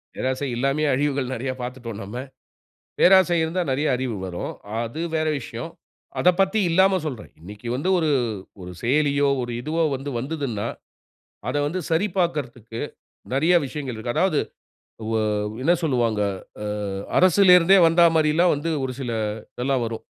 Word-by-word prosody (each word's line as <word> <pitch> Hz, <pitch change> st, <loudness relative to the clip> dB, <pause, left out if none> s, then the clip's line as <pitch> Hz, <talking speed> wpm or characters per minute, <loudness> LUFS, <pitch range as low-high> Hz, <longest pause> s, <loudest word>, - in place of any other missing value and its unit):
பேராசை 130 Hz, +2 st, -2 dB
இல்லாமயே 135 Hz, +5 st, +1 dB
அழிவுகள் 140 Hz, -2 st, -1 dB
நெறைய 130 Hz, +2 st, -3 dB
பாத்துட்டோம் 120 Hz, -3 st, -6 dB
நம்ம. 100 Hz, +4 st, -8 dB, 0.8 s
பேராசை 185 Hz, -2 st, +6 dB
இருந்தா 170 Hz, +3 st, -1 dB
நெறைய 145 Hz, +4 st, 0 dB
அறிவு 125 Hz, -3 st, -3 dB
வரும். 90 Hz, -2 st, -4 dB, 0.3 s
அது 120 Hz, +7 st, -4 dB
வேற 155 Hz, 0 st, +1 dB
விஷயம். 120 Hz, +5 st, -7 dB, 0.5 s
அதப் 180 Hz, 0 st, +4 dB
பத்தி 195 Hz, +3 st, +3 dB
இல்லாம 190 Hz, +3 st, +4 dB
சொல்றேன். 130 Hz, -8 st, -6 dB
இன்னைக்கு 105 Hz, +6 st, -10 dB
வந்து 150 Hz, +8 st, -1 dB
ஒரு 160 Hz, -3 st, +1 dB, 0.5 s
ஒரு 90 Hz, 0 st, -8 dB
செயலியோ, 140 Hz, +2 st, +2 dB
ஒரு 120 Hz, -, -5 dB
இதுவோ 160 Hz, +5 st, 0 dB
வந்து 135 Hz, +2 st, -5 dB
வந்துதுன்னா, 135 Hz, -6 st, -3 dB, 0.8 s
அத -, -, -1 dB
வந்து 175 Hz, +5 st, -2 dB
சரி 165 Hz, +5 st, +2 dB
பாக்கிறதுக்கு 125 Hz, -, -2 dB, 0.5 s
நெறைய 160 Hz, +7 st, +3 dB
விஷயங்கள் 130 Hz, -2 st, -5 dB
இருக்கு. 120 Hz, +2 st, -4 dB
அதாவது 185 Hz, -5 st, +2 dB, 0.7 s
வ 115 Hz, -, 0 dB, 0.5 s
என்ன 170 Hz, +5 st, +4 dB
சொல்லுவாங்க, 120 Hz, -8 st, +1 dB, 0.4 s
அ -, -, -4 dB, 0.5 s
அரசிலிருந்தே 185 Hz, 0 st, +6 dB
வந்தா 170 Hz, +1 st, +5 dB
மாரில்லாம் 160 Hz, +3 st, +3 dB
வந்து 155 Hz, +3 st, -2 dB
ஒரு 130 Hz, -, -4 dB
சில 125 Hz, -3 st, -3 dB, 0.4 s
இதெல்லாம் 130 Hz, 0 st, 0 dB
வரும். 115 Hz, 0 st, -5 dB
140 Hz, 140 wpm, -23 LUFS, 120-165 Hz, 0.8 s, பேராசை